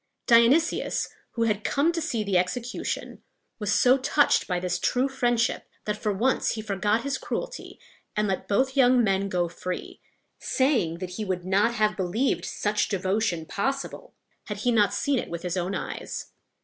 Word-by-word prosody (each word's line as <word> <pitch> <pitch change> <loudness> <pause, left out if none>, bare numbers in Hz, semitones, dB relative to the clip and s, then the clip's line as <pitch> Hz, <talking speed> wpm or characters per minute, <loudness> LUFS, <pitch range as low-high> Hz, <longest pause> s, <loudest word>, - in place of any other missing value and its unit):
Dionysius, 245 +7 +3 0.2
who 230 - 0
had 215 -2 0
come 290 +7 +2
to 335 -1 -2
see 235 -9 -1
the 200 -2 -1
execution, 230 +8 -2 0.4
was 210 -1 -1
so 255 +4 +5
touched 290 +2 +3
by 180 -2 0
this 180 0 -2
true 255 +2 +1
friendship, 240 -3 0 0.2
that 210 - -1
for 210 0 -1
once 230 +7 +1
he 220 - -5
forgot 210 +2 0
his 280 -1 -2
cruelty, - - -5 0.4
and 210 0 +1
let 190 -1 -2
both 260 +6 +1
young 250 -2 +5
men 195 -1 +1
go 175 -2 0
free, 180 +2 -6 0.4
saying 240 - +1
that 180 0 -6
he 220 - -2
would 185 -3 -3
not 205 +5 +2
have 215 -2 +2
believed 200 +8 0
such 210 0 -1
devotion 190 -3 0
possible 275 - -3 0.3
had 210 - -5
he 245 - +4
not 210 -4 +4
seen 280 -3 +1
it - - -5
with 170 0 -5
his 180 0 -2
own 180 +1 -1
eyes. - - -5
215 Hz, 175 wpm, -26 LUFS, 190-255 Hz, 0.4 s, so